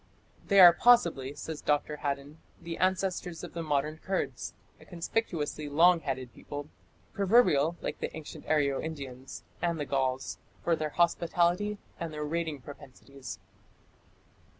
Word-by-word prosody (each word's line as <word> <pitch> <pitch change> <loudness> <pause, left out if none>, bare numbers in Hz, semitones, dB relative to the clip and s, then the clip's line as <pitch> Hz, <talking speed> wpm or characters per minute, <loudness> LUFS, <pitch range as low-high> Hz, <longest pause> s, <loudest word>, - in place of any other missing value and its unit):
"They 200 -1 +5
are 175 -2 +11
possibly", 165 - +4
says 155 +1 -6
Dr. 150 0 0
Haddon, 145 +2 -4 0.2
"the 165 -1 -6
ancestors 185 -2 -1
of 175 - -8
the 170 - -4
modern 150 0 -1
Kurds", 190 +2 -3 0.2
a - - -16
conspicuously 165 -5 -3
long 170 +4 +5
headed 130 -5 -4
people, 145 +1 -7 0.4
proverbial, 185 - +4
like - - -3
the - - -4
ancient 155 - -10
Aryo 140 -3 +2
Indians 135 -5 -7 0.2
and 170 -2 0
the 145 - -2
Gauls, 130 -1 -1 0.2
for 170 - +3
their 155 -1 -2
hospitality 175 +4 +1 0.2
and 170 -1 -4
their 150 -1 -4
raiding 160 -2 -2
propensities. 135 0 -10
155 Hz, 135 wpm, -30 LUFS, 140-175 Hz, 0.4 s, are